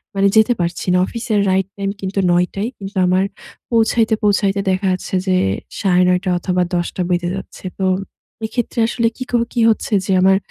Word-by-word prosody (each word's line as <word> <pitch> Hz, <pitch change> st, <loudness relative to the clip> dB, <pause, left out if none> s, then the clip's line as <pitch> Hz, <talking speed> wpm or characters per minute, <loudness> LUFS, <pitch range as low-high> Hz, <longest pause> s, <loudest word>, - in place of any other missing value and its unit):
মানে 195 Hz, 0 st, +3 dB
যেতে 220 Hz, +3 st, +5 dB
পারছি 170 Hz, 0 st, -2 dB
না। 180 Hz, -, +4 dB
অফিসের 225 Hz, -2 st, -2 dB
রাইট 190 Hz, 0 st, +1 dB
টাইম 195 Hz, 0 st, -2 dB
কিন্তু 195 Hz, +1 st, -2 dB
৯:০০ 180 Hz, +2 st, +1 dB
ই। -, -, -3 dB
কিন্তু 195 Hz, +1 st, -7 dB
আমার 185 Hz, +1 st, +3 dB, 0.5 s
পৌঁছাইতে, 225 Hz, 0 st, +2 dB
পৌঁছাইতে 200 Hz, -1 st, +2 dB
দেখা 190 Hz, +1 st, 0 dB
যাচ্ছে, 185 Hz, +1 st, -3 dB
যে 185 Hz, -, +3 dB, 0.4 s
৯:৩০ 180 Hz, 0 st, +2 dB
অথবা, 180 Hz, +1 st, 0 dB
১০:০০ 175 Hz, +1 st, -2 dB
বেজে 175 Hz, 0 st, 0 dB
যাচ্ছে। 195 Hz, -, -9 dB
তো, 190 Hz, -, 0 dB, 0.6 s
এক্ষেত্রে 235 Hz, +1 st, -3 dB
আসলে 235 Hz, -1 st, 0 dB
কী 255 Hz, -, -4 dB
কর 240 Hz, -1 st, +2 dB
কি 240 Hz, -, +1 dB
হচ্ছে, 220 Hz, 0 st, -1 dB
যে -, -, -1 dB
আমার 190 Hz, 0 st, +5 dB
195 Hz, 175 wpm, -18 LUFS, 185-220 Hz, 0.6 s, যেতে